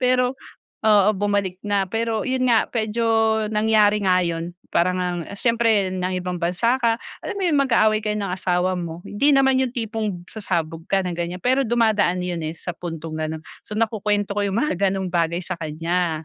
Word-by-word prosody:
pero 250 +1 +2 0.5
oo 210 -2 +5
bumalik 200 -2 -1
na, 200 -1 +1
pero 225 0 -1
yun 260 -1 0
nga, 230 -2 +4
medyo, 230 0 -1 0.5
nangyari 210 -1 +3
nga 185 -1 +4
yun. 170 0 -3 0.2
Para 175 +2 +3
ngang, 175 -2 -2
siyempre 230 -4 +2
nang 185 0 -2
ibang 180 0 -3
bansa 195 +9 +1
ka, 230 -1 +2 0.3
alam - - -3
mo - - -3
yung 300 -5 +3
mag-aaway 220 -5 +3
kayo 210 0 -1
ng 195 -3 -3
asawa 180 0 0
mo. 170 -1 -5
Hindi 280 +8 +2
naman 265 -1 +4
yung 255 -2 0
tipong 215 -6 -3
sasabog 165 -6 -3
ka 195 -1 +2
ng 180 - -3
gan'yan, 175 +1 -4
pero 260 +2 +2
dumadaan 215 -6 +2
yun, 175 -2 -3
eh, 155 - -3
sa - - -5
puntong 165 -2 -6
ganun. 155 0 -3 0.2
So, - - -10
nakukwento 210 -2 0
ko 205 - +1
yung 200 +3 -1
mga 300 - 0
gano'ng 190 -1 -2
bagay 170 0 0
sa 185 0 -4
kanya. 165 +1 -2
200 Hz, 185 wpm, -22 LUFS, 175-225 Hz, 0.5 s, oo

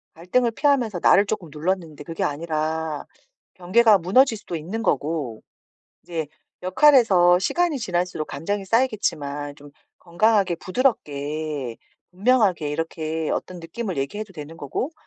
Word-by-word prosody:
갈등을 230 +9 +1
피하면서 245 - +1
나를 200 - +5
쪼끔 200 -6 -4
눌렀는데 160 -1 -3
그게 165 +2 -4
아니라 155 0 -2 0.5
경계가 205 +4 +4
무너질 220 +7 +3
수도 175 -4 -7
있는 190 +9 -4
거고 145 - -1 0.6
이제 160 -4 -4 0.4
역할에서 185 -6 +5
시간이 340 - +1
지날수록 180 -6 -2
감정이 200 +3 -3
쌓이겠지만 150 - -1
좀 145 0 -14 0.3
건강하게 190 +1 +2
부드럽게 150 - -2 0.3
분명하게 195 - +2
이렇게 160 0 -3
어떤 180 -1 -4
느낌을 180 +2 -5
얘기해도 205 +9 -4
되는 155 +1 -9
거고 170 - -3
175 Hz, 325 characters per minute, -23 LUFS, 155-215 Hz, 0.6 s, 나를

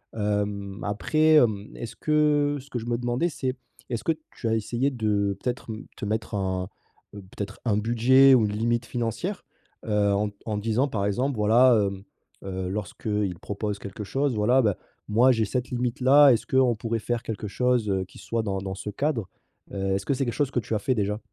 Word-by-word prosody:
Hem, 105 -1 -2
après, 155 +10 +2
hem, 110 -7 +3
est-ce 115 - -7
que 150 -1 +2
ce 140 - -18
que 125 - -3
je 115 - -7
me 120 - 0
demandais, 120 +6 0
c'est 130 -4 -3 0.3
est-ce 120 -3 -3
que 165 - +3 0.2
tu 115 - -4
as 115 - +2
essayé 120 +5 0
de 105 -5 0
peut-être 125 -1 -3
m 110 - -9
te - - -5
mettre 110 +1 -2
un, 95 -2 -2 0.5
heu, 100 - -8
peut-être 100 +2 -7
un 105 -3 +2
budget 120 +5 +5
ou 115 -4 +4
une 105 - -2
limite 120 +2 0
financière? 125 - -3 0.4
Heu, 105 -2 +2
en 105 +1 +1
d - - -18
en 110 -2 -2
disant 115 +6 +1
par 100 -5 -1
exemple, 125 +5 0
voilà, 115 +3 +5
hem, 95 0 -6 0.4
heu, 95 -1 -4
lorsqu'ils 105 -2 -3
proposent 100 0 -4
quelque 100 +2 -7
chose: 135 +2 0
«Voilà, 120 +5 +3
bah, 105 -5 +1 0.3
moi 120 +5 +5
j'ai 115 -2 +1
cette 125 +4 -3
limite-là, 130 +4 +5
est-ce 115 - -1
qu'on 130 -2 +3
pourrait 115 +1 -2
faire 120 +1 -2
quelque 110 -1 -5
chose, 125 -2 +1
heu, 95 -1 0
qui - - -16
soit 115 -1 -2
dans 100 -2 -2
dans 95 0 -5
ce 105 +1 -6
cadre?» 130 - -1 0.5
heu, 95 0 -1
est-ce 100 0 -3
que - - +1
c'est 135 +1 -1
quelque 120 - -2
chose 145 -3 0
que 125 - 0
tu 110 - -3
as - - 0
fait 130 +3 0
déjà? 105 -1 -1
110 Hz, 210 wpm, -26 LUFS, 105-125 Hz, 0.5 s, budget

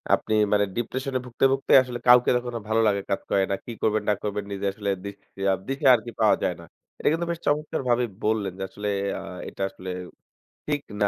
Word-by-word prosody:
আপনি 110 - -4 0.2
মানে 105 0 +4
ডিপ্রেশনে 130 +2 -2
ভুগতে, 125 +2 0
ভুগতে 135 0 -1
আসলে 120 -1 -6
কাউকে 125 0 +7
তখন 120 0 -4
আর 105 - -8
ভালো 115 +1 +3
লাগা 100 -1 +2
কাজ 95 - 0
করে 95 - +3
না। - - +2
কী 120 - -6
করবেন 110 -1 +1
না - - +5
করবেন, 105 -1 -2
নিজে 100 0 -3
আসলে 100 -1 -3 0.2
দিশা 100 -1 -3 0.2
দিশা 135 +1 0
আরকি 120 +1 -5
পাওয়া 110 - +5
যায় 90 - +1
না। - - -12 0.3
এটা - - -2
কিন্তু 170 +2 0
বেশ 170 - -4
চমৎকারভাবেই 130 -5 +1 0.2
বললেন 105 -4 0
যে - - -2
আসলে 105 0 -6 0.3
আ - - -7 0.3
এটা - - -10
আসলে 95 -1 -9 0.8
ঠিক 145 -1 0 0.2
না। 100 - +5
110 Hz, 205 wpm, -25 LUFS, 100-130 Hz, 0.8 s, কাউকে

